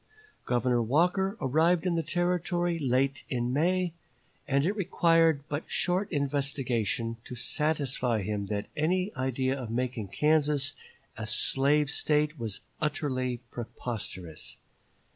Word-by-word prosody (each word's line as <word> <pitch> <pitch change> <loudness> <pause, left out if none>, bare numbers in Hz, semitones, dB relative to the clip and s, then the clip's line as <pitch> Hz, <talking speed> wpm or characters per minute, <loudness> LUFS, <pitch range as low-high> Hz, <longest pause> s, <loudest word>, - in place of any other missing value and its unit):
Governor 120 0 +2
Walker 180 - +2
arrived 165 +5 +3
in 180 - +2
the 165 - +1
Territory 175 +1 0
late 135 0 +1
in 120 -1 -1
May, 175 +4 +2 0.5
and 140 +1 +2
it 200 +4 +1
required 165 -6 +3
but 145 +1 -4
short 185 +2 0
investigation 135 - -1
to 125 - -8
satisfy 130 -5 0
him 100 0 -2
that 105 0 -2
any 180 +6 +1
idea 130 0 0
of 120 - -6
making 120 -2 -2
Kansas 150 +2 +2 0.4
a 110 0 -4
slave 140 +5 +2
State 150 0 +1
was 110 -4 -4 0.2
utterly 130 -5 -1
preposterous. 100 -8 -5
140 Hz, 120 wpm, -29 LUFS, 120-165 Hz, 0.5 s, arrived